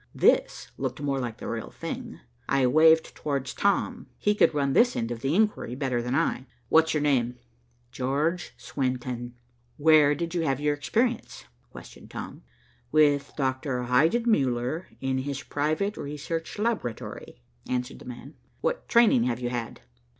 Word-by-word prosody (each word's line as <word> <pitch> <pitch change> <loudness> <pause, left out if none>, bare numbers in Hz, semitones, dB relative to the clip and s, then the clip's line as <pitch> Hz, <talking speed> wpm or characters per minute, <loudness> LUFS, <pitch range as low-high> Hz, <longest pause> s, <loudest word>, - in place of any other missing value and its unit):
This - - +2
looked - - -3
more 140 -2 -1
like 120 -3 -4
the - - -7
real - - -4
thing. - - -7 0.3
I 135 -2 +3
waved 160 +5 +5
towards 135 -3 -3
Tom. 215 +5 0
He 210 - +2
could 210 - +4
run 140 -3 0
this 245 - +4
end 115 +1 -2
of 120 - -4
the 135 +6 0
inquiry 210 - +1
better 130 -3 -1
than 125 +2 -2
I. 140 -4 0 0.2
"What's 160 0 +4
your 150 - +1
name?" 125 -4 +1 0.5
"George 145 +8 -1
Swenton." 125 -2 -3 0.4
"Where 150 -1 +5
did 170 +2 -4
you 175 - 0
have 135 -4 0
your 150 0 +1
experience?" 235 - -1 0.3
questioned - - -12
Tom. - - -7 0.5
"With 145 -2 +3
Doctor 130 -2 -1
Heidenmuller, 140 - +2 0.2
in 135 0 0
his 140 +1 -4
private 155 +8 -1
research 150 +5 -5
laboratory," 205 - -3 0.3
answered 125 0 -2
the - - -13
man. 125 +4 -9 0.3
"What - - -2
training 225 - +5
have 120 -1 -1
you 120 -1 -2
had?" 120 -2 -5
145 Hz, 150 wpm, -27 LUFS, 125-165 Hz, 0.5 s, waved